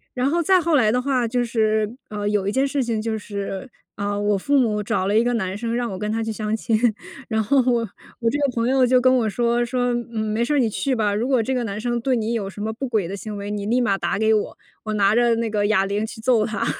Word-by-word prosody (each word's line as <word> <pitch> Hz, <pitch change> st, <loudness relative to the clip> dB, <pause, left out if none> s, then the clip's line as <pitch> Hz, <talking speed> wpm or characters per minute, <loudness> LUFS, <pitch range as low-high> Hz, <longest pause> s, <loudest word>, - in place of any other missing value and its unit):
然 250 Hz, +2 st, +1 dB
后 340 Hz, +1 st, +2 dB
再 370 Hz, +3 st, +4 dB
后 335 Hz, -1 st, +1 dB
来 220 Hz, -6 st, +4 dB
的 250 Hz, -, +1 dB
话， 255 Hz, -3 st, 0 dB
就 245 Hz, +1 st, 0 dB
是， 220 Hz, -1 st, 0 dB
呃， 205 Hz, -1 st, -3 dB
有 205 Hz, -2 st, 0 dB
一 -, -, +1 dB
件 270 Hz, +3 st, +1 dB
事 275 Hz, -1 st, -1 dB
情 230 Hz, -2 st, -1 dB
就 220 Hz, 0 st, -2 dB
是， 200 Hz, +2 st, -5 dB, 0.3 s
呃， 205 Hz, 0 st, -2 dB
我 205 Hz, -1 st, +1 dB
父 280 Hz, +9 st, +1 dB
母 215 Hz, -5 st, +2 dB
找 185 Hz, -, -1 dB
了 210 Hz, +2 st, +2 dB
一 230 Hz, -, +4 dB
个 245 Hz, 0 st, 0 dB
男 190 Hz, -4 st, -2 dB
生， 230 Hz, +1 st, -2 dB
让 240 Hz, -3 st, -2 dB
我 190 Hz, -, -6 dB
跟 210 Hz, 0 st, -2 dB
他 225 Hz, 0 st, -1 dB
去 225 Hz, -, -3 dB
相 215 Hz, 0 st, -2 dB
亲。 220 Hz, 0 st, 0 dB, 0.5 s
然 220 Hz, -1 st, +1 dB
后 275 Hz, +6 st, +3 dB
我 235 Hz, -1 st, +2 dB, 0.4 s
我 230 Hz, -1 st, +1 dB
这 290 Hz, -, -1 dB
个 285 Hz, -, +2 dB
朋 230 Hz, +1 st, +1 dB
友 265 Hz, -1 st, +4 dB
就 250 Hz, +1 st, +4 dB
跟 255 Hz, +1 st, +4 dB
我 225 Hz, -4 st, +1 dB
说， 235 Hz, +2 st, +1 dB
说： 245 Hz, 0 st, 0 dB, 0.2 s
“嗯， 220 Hz, -1 st, -2 dB
没 230 Hz, +2 st, +1 dB
事 295 Hz, -, -1 dB
儿， 285 Hz, -, +3 dB
你 230 Hz, -3 st, +2 dB
去 260 Hz, +5 st, -1 dB
吧， 210 Hz, -2 st, +1 dB
如 235 Hz, +4 st, -1 dB
果 260 Hz, -4 st, +3 dB
这 265 Hz, -, -1 dB
个 250 Hz, -2 st, 0 dB
男 205 Hz, 0 st, -4 dB
生 240 Hz, +1 st, -1 dB
对 260 Hz, 0 st, +1 dB
你 225 Hz, 0 st, -1 dB
有 200 Hz, -4 st, -2 dB
什 205 Hz, -, -9 dB
么 220 Hz, +1 st, -2 dB
不 265 Hz, +4 st, -4 dB
轨 215 Hz, -7 st, 0 dB
的 195 Hz, -, -5 dB
行 210 Hz, +2 st, -6 dB
为， 200 Hz, +1 st, -5 dB
你 205 Hz, -1 st, -3 dB
立 240 Hz, +4 st, +2 dB
马 200 Hz, -5 st, +1 dB
打 175 Hz, 0 st, -1 dB
给 220 Hz, 0 st, +3 dB
我， 210 Hz, -, -1 dB, 0.3 s
我 215 Hz, -1 st, -3 dB
拿 200 Hz, 0 st, +3 dB
着 240 Hz, -1 st, +3 dB
那 230 Hz, -1 st, -1 dB
个 205 Hz, -1 st, 0 dB
哑 195 Hz, -3 st, +3 dB
铃 205 Hz, +2 st, -1 dB
去 220 Hz, +1 st, -9 dB
揍 235 Hz, -3 st, +3 dB
他。” 215 Hz, -3 st, -2 dB
225 Hz, 305 characters per minute, -22 LUFS, 210-245 Hz, 0.5 s, 再